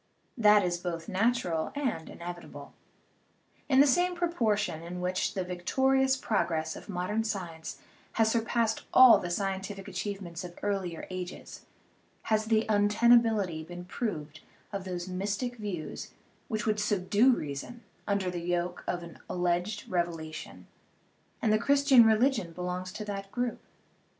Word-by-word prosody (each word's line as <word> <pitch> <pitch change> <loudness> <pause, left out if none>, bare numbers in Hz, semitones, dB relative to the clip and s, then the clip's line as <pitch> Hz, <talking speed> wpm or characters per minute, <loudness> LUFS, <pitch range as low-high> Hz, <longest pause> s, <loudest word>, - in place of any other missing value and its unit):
That 210 -4 +5
is 175 -1 -1
both 170 -2 -4
natural 190 -6 0
and 260 - -2
inevitable. 170 -5 -9 1.0
In 265 -1 +6
the - - +7
same 355 +6 +2
proportion 220 - 0
in 175 +2 -6
which 180 +1 -1
the 190 - 0
victorious 265 +9 +2
progress 160 -9 -1
of - - -11
modern 200 +4 -1
science 175 -7 -5 0.4
has 220 -1 +3
surpassed 230 -1 +1
all 255 -2 +9
the 175 - -4
scientific 195 +1 -3
achievements 190 -4 -5
of 175 -1 -9
earlier 195 -5 -2
ages 185 -1 -7 0.6
has 215 -1 +1
the 220 0 +2
untenability 210 -4 +3
been 175 +2 -9
proved 160 -7 -4 0.3
of 195 -1 -4
those 180 -1 -4
mystic 205 +7 -3
views 195 -8 -5 0.4
which 220 -4 -2
would 215 -1 +1
subdue 210 +4 +3
reason 155 - -5 0.2
under 200 -3 0
the 175 -1 -4
yoke 175 +1 -2
of 175 -1 -2
an 170 -1 -11
al - - -3
leged 180 +4 0
revelation; 165 -3 -4 0.8
and 215 -2 +3
the 215 - +3
Christian 275 -2 +6
religion 220 -5 +2
belongs 180 +1 -4
to 210 +2 -6
that 195 -1 -5
group. 245 -1 -2
195 Hz, 140 wpm, -29 LUFS, 175-225 Hz, 1.0 s, all